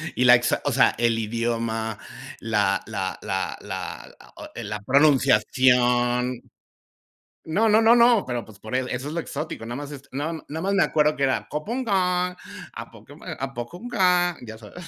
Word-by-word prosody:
Y 125 - +2
la 125 0 +9
exac 120 +1 0
o - - +1
sea, - - +3
el 115 -1 +2
idioma, 115 -1 -2 0.4
la - - +1
la - - -4
la - - -3
la - - -6 0.5
eh, 120 - -6
la 105 0 -5
pronunciación. 125 -1 +3 1.0
No 210 +8 +1
no 215 +2 +5
no 225 +1 +6
no, 235 -3 +5
pero 120 -2 -3
pues 110 -2 -16
por 110 +4 -6
él 130 0 0
eso 130 +3 -4
es 150 - -5
lo 170 - -2
exótico. 150 -7 -6
Nada 120 +2 -5
más 145 0 -7
es 140 -2 -9
no, 145 +5 -3 0.2
nada 160 +2 -5
más 195 +1 0
me 195 - +4
acuerdo 150 0 +2
que 140 - -2
era, 130 - 0
cupong 230 +13 -3
cong, 180 -3 +1 0.4
a - - -8
cop - - -17 0.3
a 135 0 -4
poco 130 +9 -7
clan, 180 -6 +2
ya 110 0 -9
sabes. 120 - -12
135 Hz, 180 wpm, -24 LUFS, 120-175 Hz, 1.0 s, la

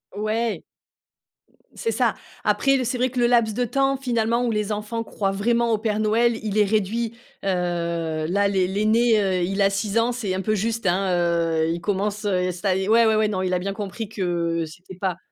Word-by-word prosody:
Ouais. 215 +2 -1 1.1
C'est 455 - -2
ça. - - +1 0.3
Après, 275 -1 +2
c'est 245 +1 -1
vrai 255 +1 +2
que 250 - -4
le 240 - +4
laps 235 -3 +3
de 245 +1 +1
temps, 275 +2 +1
finalement, 235 -2 0
où 235 - 0
les 210 -1 -1
enfants 210 +2 -3
croient 195 -3 -2
vraiment 235 +4 +1
au 220 - +1
Père 215 -1 -1
Noël, 225 +2 +2
il 215 -1 -2
est 210 - +5
réduit. 220 +3 0 0.3
Heu, - - -3 0.8
là, 200 +4 +2
l'aî 190 -2 +1
l'aîné, 215 +3 +3
heu, 190 -3 +1
il 195 +3 -2
a 195 0 +4
6 200 +2 -1
ans, 230 +2 +3
c'est 220 -6 -2
un 190 - -2
peu 215 +2 0
juste, 225 +2 -2
hein, 190 +2 +2
heu, 170 -2 +1
il 170 0 -3
commence, 205 +3 -2
heu, 185 -2 +1
ça 185 +2 -1
y 190 +1 -1
ouais, 230 +1 +5
ouais, 215 -1 +3
non, 195 -3 -2
il 185 -1 -1
a 180 - +1
bien 195 +2 -3
compris 210 +1 -5
que 170 -5 -1
c'était 175 +4 -12
pas 185 -3 -1
210 Hz, 210 wpm, -23 LUFS, 190-230 Hz, 1.1 s, est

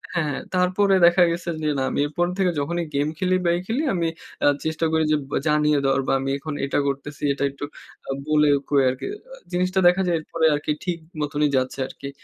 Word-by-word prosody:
হ্যাঁ, 150 -4 0 0.2
তারপরে 185 +2 +3
দেখা 175 +1 +6
গেছে 170 0 -4
যে 150 - +1
না 135 - 0
আমি - - -2
এরপর 175 +4 0
থেকে 185 -2 +3
যখনই 170 +4 -2
গেম 145 +1 +1
খেলি 185 0 +2
বা - - +3
এই - - -4
খেলি 255 +8 0
আমি 170 -1 0 0.4
আ - - +6 0.2
চেষ্টা 160 +1 -1
করি 160 0 +3
যে 155 - +4
ব - - -20 0.2
জানিয়ে 150 -1 +3
দেওয়ার 135 0 +2
বা - - +2
আমি 135 0 -3
এখন 155 +1 -6
এটা 140 - 0
করতেছি 140 +2 -5
এটা 140 - -3
একটু 140 +1 -6 0.4
আ - - 0 0.2
বলে 150 -1 +4 0.2
কয়ে 140 -2 +4
আরকি 130 +1 -4 0.3
আ - - -8 0.2
জিনিসটা 185 +1 +1
দেখা 180 +2 +4
যায় 170 - +2
এরপরে 160 +1 -1
আরকি 150 +1 -2
ঠিক 175 -2 -2 0.2
মতনই 150 0 +1
যাচ্ছে 130 +1 -2
আরকি। 140 - -8
155 Hz, 215 wpm, -23 LUFS, 145-175 Hz, 0.4 s, দেখা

